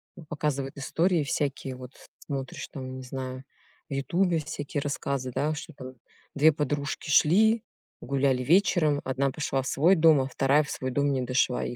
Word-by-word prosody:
ну, 170 - -12
показывают 145 -3 -3
истории 165 +4 +1
всякие, 140 -1 -2
вот 125 0 -10 0.3
смотришь, 135 -2 -5
там, 130 -1 -7
не 130 - -8
знаю, 130 0 -6 0.5
в - - -5
"Ютубе" 170 +6 +1
всякие 145 -1 -4
рассказы, 140 -2 -3
да, 150 +2 0
что, 155 +2 -8
там, 130 -1 -10 0.4
2 155 +2 +6
подружки 145 +1 -3
шли, 215 +10 +4 0.4
гуляли 135 -1 0
вечером, 155 -2 +3
1 135 +1 0
пошла 135 -1 -1
в 130 - -6
свой 170 +9 +4
дом, 160 -4 +5
а 130 - -2
2 135 +2 +2
в 145 - -8
свой 130 0 -3
дом 145 +2 +1
не 130 -2 0
дошла 125 0 +1
и 120 - -5
140 Hz, 175 wpm, -27 LUFS, 130-155 Hz, 0.5 s, 2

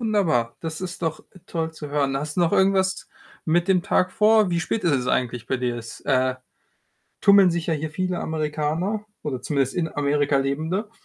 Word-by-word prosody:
Wunderbar. 180 - +1
Das 160 0 -5
ist 180 -1 -6
doch 160 -1 -2 0.3
toll 160 -1 -3
zu 150 -2 -8
hören. 140 -2 0
Hast 150 +3 -4
du - - +2
noch 170 - +2
irgendwas 190 0 +2 0.4
mit 170 +2 +1
dem 185 -2 +3
Tag 185 +1 +1
vor? 215 -1 +4
Wie 170 - +1
spät 200 +6 -2
ist 170 - +3
es 130 -3 0
eigentlich 125 -1 -1
bei 130 - 0
dir? 125 -1 -2
Es, 115 -1 -9
äh, 130 -1 +1 0.9
tummeln 200 -2 +7
sich 170 -1 -2
ja 165 - +1
hier 155 +1 -4
viele 180 +2 -2
Amerikaner 160 +6 -2 0.2
oder 130 -5 -3
zumindest 135 0 -1
in 170 -2 0
Amerika 145 -1 +1
Lebende? 160 +10 -1
160 Hz, 190 wpm, -23 LUFS, 140-185 Hz, 0.9 s, tummeln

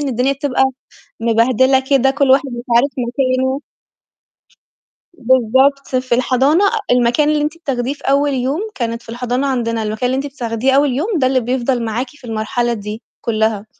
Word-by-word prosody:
إن 285 - -2
الدنيا 255 +2 +1
بتبقى 275 -1 0 0.6
مبهدلة 235 +3 +3
كده 270 0 +2
كل 275 -1 +2
واحد 275 +2 +4
مش 240 -1 -6
عارف 255 +5 +4
مكانه. 255 +2 0 1.5
بالضبط، 260 0 +2
في 255 -1 0
الحضانة 265 +7 +2 0.3
المكان 245 +4 +3
اللي 300 -1 +1
أنتِ 305 +3 -3
بتاخديه 265 -5 -2
في - - -21
أول 280 +1 +2
يوم 265 +6 -1
كانت 230 -4 -3
في - - -22
الحضانة 245 +3 -2
عندنا، 230 -4 -1
المكان 215 +3 -2
اللي 255 +1 0
أنتِ 275 +2 -2
بتاخديه 240 0 -1
أول 280 0 +3
يوم 295 - -2
ده 260 - +2
اللي 260 0 +2
بيفضل 250 0 -1
معاكِ 230 +3 -2
في 290 - -20
المرحلة 225 +2 -1
دي 210 +1 -6 0.2
كُلّها، 220 -2 -1
255 Hz, 165 wpm, -17 LUFS, 235-275 Hz, 1.5 s, واحد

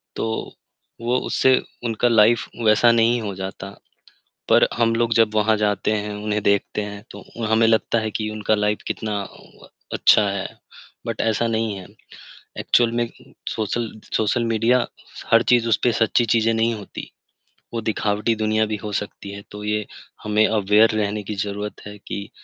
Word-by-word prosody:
तो, 110 0 -3 0.5
वो 120 +2 +1
उससे 130 -1 +4 0.3
उनका 115 +1 +1
लाइफ 115 0 +4 0.2
वैसा 110 +2 +5
नहीं 115 +1 +3
हो 105 -2 -4
जाता। 95 +1 -6 0.8
पर - - +5
हम 115 -1 +2
लोग 115 -1 +1
जब 110 -2 +3
वहाँ 110 0 +3
जाते 105 0 0
हैं, 105 -1 -2
उन्हें 105 0 -2
देखते 100 +1 +1
हैं 105 0 -7
तो - - -11 0.2
हमें 110 +1 +3
लगता 115 +1 +2
है 110 -1 -3
कि 110 0 -3
उनका 110 0 0
लाइफ 105 0 0
कितना 105 -2 -3
अ, - - -11 0.3
व - - -15 0.2
अच्छा 105 -1 +4
है, 100 -1 -3 0.6
बट - - -4
ऐसा 115 +1 +1
नहीं 110 -2 -1
है। 95 -2 -9 0.7
एक्चुअल 120 -1 +2
में 120 0 0 0.4
सोशल 110 +1 -2 0.3
सोशल 110 +2 +1
मीडिया, 115 +2 +2 0.5
हर 115 0 +7
चीज़ 120 -1 +3
उसपे 120 +2 +2
सच्ची 115 +2 +2
चीज़ें 115 0 +2
नहीं 115 +1 +1
होती। 105 -2 -8 0.7
वो 115 - -1
दिखावटी 105 +1 0
दुनिया 110 0 +1
भी 110 0 -3
हो 105 +1 -7
सकती 100 0 -5
है, 100 0 -8
तो 105 0 -9
ये 105 0 -1 0.4
हमें 105 +1 +3
अवेयर 105 +1 +4
रहने 105 0 -1
की 105 - -5
ज़रूरत 105 +1 -4
है 105 - -8
कि, 100 0 -7
110 Hz, 170 wpm, -22 LUFS, 105-115 Hz, 0.8 s, हर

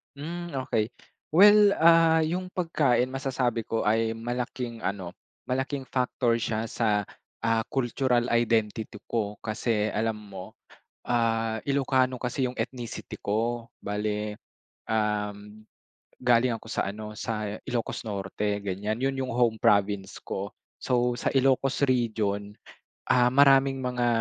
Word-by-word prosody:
Hmm, 170 +4 -5 0.2
okey. 110 -4 0 0.5
Well, 205 +2 +7
ah, 165 0 +5
yung 180 +4 -2
pagkain 145 -9 +1
masasabi 125 -4 -1
ko 115 0 -1
ay 110 +1 +1
malaking 120 0 -4
ano, 95 -4 -3 0.3
malaking 130 +2 -2
factor 125 -2 0
siya 110 -1 -1
sa, 105 -3 +1 0.4
ah, 115 0 +2
cultural 125 -1 0
identity 115 -2 +1 0.2
ko 105 -3 -1
kasi 110 -1 0
alam 110 +1 0
mo, 100 -3 -10 0.5
ah, 115 -2 0
Ilokano 130 -2 +1
kasi 125 +1 -1
yung 125 - -1
ethnicity 120 0 -5
ko. 115 +3 -1
Bale, 105 0 -3 0.5
uhm, 105 -1 -2 0.5
galing 125 0 +3
ako - - -14
sa - - -1
ano, 105 +2 -6
sa 110 -1 -3 0.2
Ilocos 120 -4 -3
Norte, 100 0 -2
ganyan. 100 +3 -3
Yun 135 0 0
yung 130 - -4
home 120 -2 +2
province 100 -2 +1
ko. 100 +1 -5 0.2
So, 125 -1 0
sa - - -1
Ilocos 135 0 +2
region, 105 -5 0 0.5
ah, 125 -1 +4
maraming 135 0 +4
mga, 125 -1 0
115 Hz, 125 wpm, -27 LUFS, 105-130 Hz, 0.5 s, Well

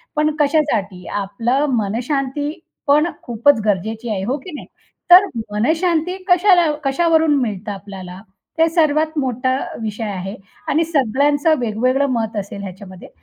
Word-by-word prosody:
पण 305 0 +1
कशासाठी? 235 - 0
आपलं 230 +8 -1
मनःशांती 265 +7 -2 0.4
पण 300 +3 +4 0.2
खूपच 240 +2 +2
गरजेची 220 +4 -1
आहे. 195 -3 -2
हो 250 +8 -1
की 300 +6 -10
नाही? - - -9 0.4
तर 365 +3 +9 0.3
मनःशांती 320 - +1
कशाला 355 -3 +4
कशावरून 320 +2 +2
मिळतं 210 -3 -3
आपल्याला? 190 -2 -9 0.4
ते 325 0 +4
सर्वात 310 -1 +1
मोठा 260 -1 0 0.2
विषय 220 0 -4
आहे. 195 -1 -4 0.3
आणि 320 +3 +2
सगळ्यांचं 290 +1 +2
वेगवेगळं 250 +4 +1
मत 225 -3 -2
असेल 200 0 -5
ह्याच्यामध्ये. 190 -1 -10
255 Hz, 125 wpm, -19 LUFS, 210-305 Hz, 0.4 s, तर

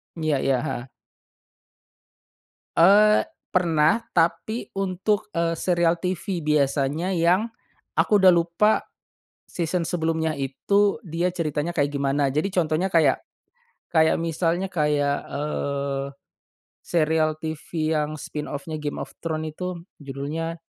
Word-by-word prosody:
Iya 155 -4 0
iya, 135 -1 +2
heeh. 120 +2 -4 1.9
Eee, 205 +5 +6 0.2
pernah 170 +4 +2
tapi 170 +7 0
untuk, 195 +2 -1
eee, 165 0 0
serial 175 -1 +2
TV 180 -1 -3
biasanya 145 +3 +1
yang 180 +5 +2 0.5
aku 205 -2 +4
udah 190 - +8
lupa, 175 +5 +3 0.6
season 175 +1 -2
sebelumnya 160 -1 -1
itu 200 - +1
dia 170 -2 -2
ceritanya 160 0 -2
kayak 145 -2 +1
gimana. 140 0 +1
Jadi 155 +8 0
contohnya 165 +1 +1
kayak, 160 -7 +3 0.7
kayak 160 -2 +3
misalnya 165 +2 0
kayak, 150 -5 0
eee, 140 -1 -2 0.8
serial 155 -1 +1
TV 160 0 -3
yang 150 0 -2
spinoff-nya 150 +1 -5
Game 150 -1 -4
of - - -7
Thrones 155 -1 -3
itu 180 0 -4 0.2
judulnya, 150 +5 -4
165 Hz, 110 wpm, -24 LUFS, 150-180 Hz, 1.9 s, udah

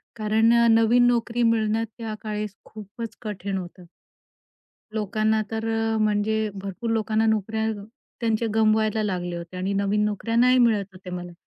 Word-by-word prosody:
कारण 220 +1 +3 0.2
नवीन 230 +2 +5
नोकरी 240 0 +1
मिळण्यात 225 -1 +2
त्या 225 -2 -5
काळेस 210 -2 -4
खूपच 220 +2 -8
कठीण 200 -3 -4
होतं. 180 0 -8 1.1
लोकांना 215 +1 +1
तर 225 0 -3
अ, 225 0 0
म्हणजे 215 +1 +1
भरपूर 200 +4 -5
लोकांना 220 0 +1
नोकऱ्या 220 0 0
अ, 205 -2 -6 0.4
त्यांचे 230 -1 0
गमवायला 220 0 +2
लागल्या 180 -4 -2
होत्या 170 +2 -8
आणि 195 +2 -1
नवीन 200 +1 +1
नोकऱ्या 210 +2 -2
नाही 250 +2 +5
मिळत 225 -5 +3
होत्या 185 -1 -10
मला. 175 0 -6
215 Hz, 145 wpm, -24 LUFS, 200-225 Hz, 1.1 s, नवीन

